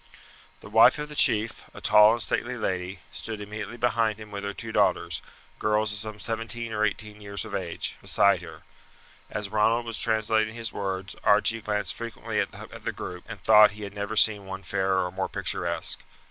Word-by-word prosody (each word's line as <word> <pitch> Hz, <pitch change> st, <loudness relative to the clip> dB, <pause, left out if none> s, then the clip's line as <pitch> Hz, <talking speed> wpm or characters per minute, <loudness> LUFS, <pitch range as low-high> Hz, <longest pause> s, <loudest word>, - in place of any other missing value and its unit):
The -, -, -11 dB
wife 115 Hz, +5 st, +7 dB
of 150 Hz, 0 st, -5 dB
the 150 Hz, -, -8 dB
chief, 110 Hz, -4 st, +2 dB
a -, -, -8 dB
tall 105 Hz, +1 st, +6 dB
and 120 Hz, -, -2 dB
stately 125 Hz, +1 st, -2 dB
lady, 95 Hz, -4 st, -3 dB
stood 110 Hz, -2 st, -5 dB
immediately 105 Hz, +2 st, -6 dB
behind 115 Hz, -2 st, +1 dB
him 105 Hz, -1 st, -10 dB
with 100 Hz, 0 st, -5 dB
her 100 Hz, -, -2 dB
two 110 Hz, +2 st, -7 dB
daughters, 100 Hz, -4 st, +1 dB, 0.4 s
girls 105 Hz, 0 st, +1 dB
of 105 Hz, -, +2 dB
some 110 Hz, -1 st, -3 dB
seventeen 115 Hz, 0 st, -3 dB
or 105 Hz, 0 st, 0 dB
eighteen 105 Hz, 0 st, -2 dB
years 100 Hz, +1 st, -3 dB
of 110 Hz, -, -9 dB
age, 90 Hz, -4 st, -2 dB
beside -, -, +3 dB
her. -, -, -11 dB, 0.7 s
As 105 Hz, -2 st, -3 dB
Ronald 110 Hz, +3 st, +2 dB
was 115 Hz, -2 st, -1 dB
translating 110 Hz, 0 st, +1 dB
his 115 Hz, 0 st, -5 dB
words 95 Hz, -1 st, -4 dB
Archie 115 Hz, 0 st, +3 dB
glanced 105 Hz, 0 st, 0 dB
frequently 115 Hz, -1 st, -4 dB
at -, -, 0 dB, 0.3 s
the -, -, -1 dB
group, 90 Hz, -1 st, -7 dB
and 110 Hz, -2 st, -8 dB
thought 105 Hz, +1 st, +7 dB
he 105 Hz, -, -7 dB
had 100 Hz, -1 st, -7 dB
never 100 Hz, +1 st, -4 dB
seen 105 Hz, -2 st, +3 dB
one 95 Hz, 0 st, -6 dB
fairer 95 Hz, 0 st, 0 dB
or 90 Hz, -, -4 dB
more 95 Hz, +1 st, -3 dB
picturesque. -, -, -2 dB
105 Hz, 190 wpm, -26 LUFS, 100-110 Hz, 0.7 s, wife